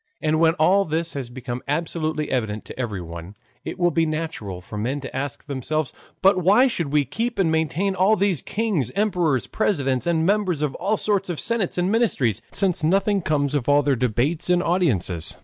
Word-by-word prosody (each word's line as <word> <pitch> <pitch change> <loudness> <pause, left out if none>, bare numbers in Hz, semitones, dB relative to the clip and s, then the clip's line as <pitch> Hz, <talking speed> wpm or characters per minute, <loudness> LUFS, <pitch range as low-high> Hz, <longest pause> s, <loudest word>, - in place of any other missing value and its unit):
And 155 -1 +1
when 165 0 +4
all 190 +5 +4
this 165 0 -2
has 135 -4 -5
become 120 0 -6
absolutely 155 0 -2
evident 110 -4 -2
to - - -10
everyone, 90 -5 -5 0.3
it - - -6
will 175 -1 +2
be 165 0 +1
natural 155 - -4
for 95 +4 -10
men 125 +7 -2
to 130 - -8
ask 140 +2 -4
themselves: 145 +1 -2 0.3
"But 190 -1 +5
why 205 +9 +6
should 170 - -1
we 150 -1 +3
keep 230 - -3
and 175 -5 +2
maintain 160 +5 0
all 190 +3 +3
these 195 -7 +1
kings, 205 - -1
emperors, 180 - +1
presidents, 140 - 0
and 165 -2 +2
members 190 -6 +1
of 145 -3 -1
all 215 +2 -1
sorts 200 -3 0
of 170 - -3
senates 230 -7 -1
and 180 +2 +1
ministries, 135 - +1
since 185 -5 0
nothing 195 +4 +2
comes 145 -3 0
of 145 -2 -1
all 145 0 +5
their 140 -1 +2
debates 125 +8 0
and 180 0 +3
audiences? 105 - 0
155 Hz, 190 wpm, -23 LUFS, 130-185 Hz, 0.3 s, why